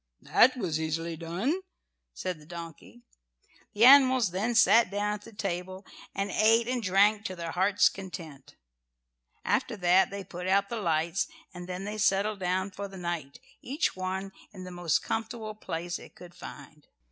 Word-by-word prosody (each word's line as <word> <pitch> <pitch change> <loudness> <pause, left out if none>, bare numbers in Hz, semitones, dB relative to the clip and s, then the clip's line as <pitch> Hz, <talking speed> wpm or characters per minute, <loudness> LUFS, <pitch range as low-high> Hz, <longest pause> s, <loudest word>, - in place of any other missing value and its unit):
"That 255 +1 +4
was 170 -9 -1
easily 165 +1 -2
done," 185 - -2 0.5
said 185 -3 -5
the 150 - -16
donkey. 160 - -10 0.7
The 215 +3 +5
animals 260 -6 +7
then 215 +6 -1
sat 225 -1 +6
down 205 +1 -1
at 210 - -6
the 230 - -13
table 190 -2 -5 0.3
and 195 0 -2
ate 225 +3 +4
and 250 -1 -1
drank 205 +2 +3
to 185 - -4
their 170 -2 -5
hearts' 190 +3 +3
content. 165 -8 -8 0.9
After - - 0
that 180 0 +4
they 200 0 -6
put 180 0 -7
out 200 +1 +2
the 235 -2 -3
lights, 170 +2 0 0.3
and 175 0 -9
then 185 +2 -5
they 210 +1 -5
settled 205 +1 +2
down 185 +2 -1
for 200 +1 -6
the 195 -1 -11
night, 170 -6 -5 0.2
each 285 +6 -1
one 190 +1 -4 0.2
in 185 -3 -10
the 180 - -8
most 175 -3 0
comfortable 225 -1 -4
place 175 -4 -5
it - - -14
could 175 -1 -13
find. 150 -1 -12
190 Hz, 170 wpm, -28 LUFS, 175-210 Hz, 0.9 s, animals